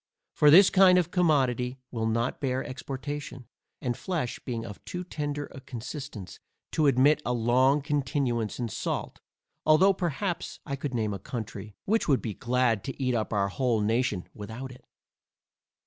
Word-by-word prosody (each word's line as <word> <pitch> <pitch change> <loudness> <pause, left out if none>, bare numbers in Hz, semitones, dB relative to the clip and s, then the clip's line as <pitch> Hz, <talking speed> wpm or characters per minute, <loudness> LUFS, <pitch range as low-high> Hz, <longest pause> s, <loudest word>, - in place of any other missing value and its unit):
For 150 - +5
this 185 +6 +8
kind 185 -1 +7
of 175 -1 +1
commodity 130 -8 +2
will 110 -2 -1
not 115 +2 -1
bear 130 -1 0
exportation, 135 0 -6 0.4
and 120 -2 0
flesh 160 -8 -3
being 115 -3 -4
of 105 -3 -9
too 180 0 -5
tender 145 -4 -4
a 135 - -9
consistence, 125 - -7 0.3
to 155 -2 +2
admit 140 +3 +4
a 125 - -1
long 130 +4 +3
continuance 135 -6 -1
in 120 - -2
salt, 110 - -4 0.4
although 170 +6 +5
perhaps 175 0 -3
I 140 - -3
could 140 -2 -4
name 110 -3 0
a 100 - -5
country, 105 -1 -6
which 220 +3 +1
would 140 -4 +4
be 110 - -3
glad 120 -2 +1
to 135 - -6
eat 130 -2 +1
up 110 -2 -1
our 100 -2 +1
whole 120 +2 +1
nation 110 -3 0
without 115 +5 -7
it. 125 - -14
130 Hz, 165 wpm, -28 LUFS, 115-145 Hz, 0.4 s, this